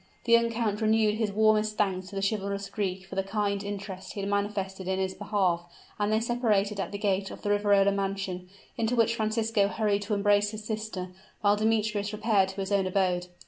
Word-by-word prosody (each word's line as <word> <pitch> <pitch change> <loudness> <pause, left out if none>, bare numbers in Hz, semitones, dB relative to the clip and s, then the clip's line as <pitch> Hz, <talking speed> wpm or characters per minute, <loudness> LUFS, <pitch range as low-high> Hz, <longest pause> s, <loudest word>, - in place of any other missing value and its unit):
The 235 - -2
young 235 0 +6
count 225 -2 -1
renewed 220 -1 +3
his 220 -2 0
warmest 215 0 +2
thanks 190 -3 0
to 200 - -10
the 195 0 +1
chivalrous 200 -1 -3
Greek 190 -2 -3
for 190 - -11
the 195 - +1
kind 200 0 -1
interest 195 -2 -6
he 200 - -4
had 200 - -3
manifested 200 -2 -2
in 190 0 0
his 190 0 -1
behalf; 180 -5 -1 0.3
and 205 0 +1
they 215 - +3
separated 220 -4 +1
at - - -3
the 200 - -4
gate 195 -1 0
of - - -10
the 205 - 0
Riverola 205 -1 +4
mansion, 195 -2 -3 0.3
into 230 +1 0
which 230 -1 +3
Francisco 220 -2 +1
hurried 205 -1 0
to 210 +1 -1
embrace 205 0 +3
his 215 0 -7
sister; 215 -4 -4 0.3
while 205 0 +4
Demetrius 215 -1 0
repaired 210 -3 +2
to 190 +1 -5
his 190 +1 -4
own 195 -2 +2
abode. 180 -2 0
205 Hz, 205 wpm, -28 LUFS, 195-215 Hz, 0.3 s, young